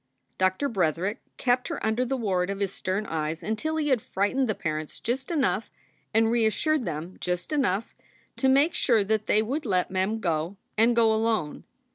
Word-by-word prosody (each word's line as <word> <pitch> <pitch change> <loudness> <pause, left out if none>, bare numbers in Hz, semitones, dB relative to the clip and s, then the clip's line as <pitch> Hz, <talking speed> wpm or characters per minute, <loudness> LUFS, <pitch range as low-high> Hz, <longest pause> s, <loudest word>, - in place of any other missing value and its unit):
Doctor 185 +9 +2
Bretherick 190 - 0 0.2
kept 250 0 +1
her - - -4
under 220 +3 +1
the 265 +2 -1
ward 190 -6 0
of 200 0 -3
his 200 -1 -1
stern 190 +3 -2
eyes 160 -1 -3
until 220 - -2
he 305 -2 0
had 255 -5 +3
frightened 250 +4 0
the 215 - +1
parents 155 -2 -4
just 260 +3 -2
enough 265 - 0 0.4
and 225 +1 +3
reassured 235 +5 +2
them 165 +2 -5
just 180 - -2
enough 230 -7 0 0.4
to 265 - +3
make 280 +5 +4
sure 230 -5 +3
that 215 +1 0
they 215 - +3
would 275 +8 -2
let 185 -6 0
Mem 190 +4 0
go, 170 0 -1 0.2
and 230 +2 +4
go 225 -2 +5
alone. 220 -8 -1
220 Hz, 180 wpm, -27 LUFS, 185-245 Hz, 0.4 s, go